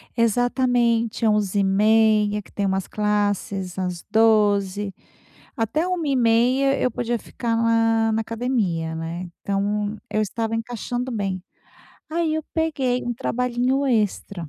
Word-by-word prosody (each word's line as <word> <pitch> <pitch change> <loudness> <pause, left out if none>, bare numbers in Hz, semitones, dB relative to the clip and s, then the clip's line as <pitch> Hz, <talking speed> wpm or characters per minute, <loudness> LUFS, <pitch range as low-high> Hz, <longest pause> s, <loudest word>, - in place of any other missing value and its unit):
Exatamente, 235 -1 +1
11:30, 210 +1 +3
que - - -20
tem 200 - -2
umas 190 -1 -1
classes 205 -3 -1
às 180 -2 -3
12:00, 205 -3 +2 0.6
até 265 +10 0
13:30 270 -5 +2
eu 255 - +1
podia 235 +1 -2
ficar 230 +1 -3
lá 225 -1 +2
na 220 - +1
academia, 215 -9 -1
né, 165 +2 -5
então 205 +2 -1
eu 215 - 0
estava 225 +2 -2
encaixando 245 +2 -3
bem. 195 -4 -2 0.7
Aí 320 -1 0
eu 315 - -2
peguei 275 -6 0
um 240 0 -3
trabalhinho 250 +2 0
extra 200 - -1
225 Hz, 115 wpm, -23 LUFS, 205-245 Hz, 0.7 s, 11:30